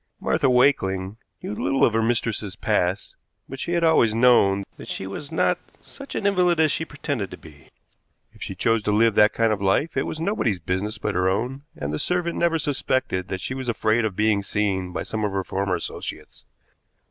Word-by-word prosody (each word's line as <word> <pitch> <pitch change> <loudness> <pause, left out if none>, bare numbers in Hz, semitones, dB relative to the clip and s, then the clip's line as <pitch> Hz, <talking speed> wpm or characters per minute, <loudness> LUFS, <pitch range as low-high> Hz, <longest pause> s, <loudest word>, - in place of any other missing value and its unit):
Martha 155 -4 +1
Wakeling 100 -7 +2 0.3
knew - - -4
little 135 +5 +2
of 115 - +1
her 115 - +2
mistress's 110 -3 -1
past, 100 -3 -1 0.3
but 135 - -8
she 170 - -3
had 170 -1 +1
always 120 -9 +4
known 115 -5 +4
that - - -10
she - - -4
was 120 +10 -7
not - - +1 0.2
such 275 0 -11
an - - -2
invalid 180 -4 +3
as 155 -2 +4
she 160 - -1
pretended 145 -9 -4
to - - -9
be. 75 -4 -16 0.7
If - - -20
she - - -5
chose 115 -1 +1
to 105 - -1
live 110 +2 +4
that 105 +1 +5
kind 115 -1 +2
of 100 - -4
life, 100 +11 +1
it - - 0
was 155 - -5
nobody's 165 - 0
business 95 +6 -2
but - - -2
her 90 +1 +2
own, 125 +8 -2
and 75 +1 -4
the 75 - -2
servant 175 -1 -1
never 170 -1 +2
suspected 130 - -1
that 95 -1 -4
she 130 - -3
was 130 -1 -4
afraid 115 0 +1
of 105 -4 -2
being 105 -1 +2
seen 100 -2 -1
by 85 -2 -3
some 110 -1 -4
of 105 -2 -1
her 95 -1 -1
former 95 0 -1
associates. 85 - -7
110 Hz, 205 wpm, -24 LUFS, 95-140 Hz, 0.7 s, that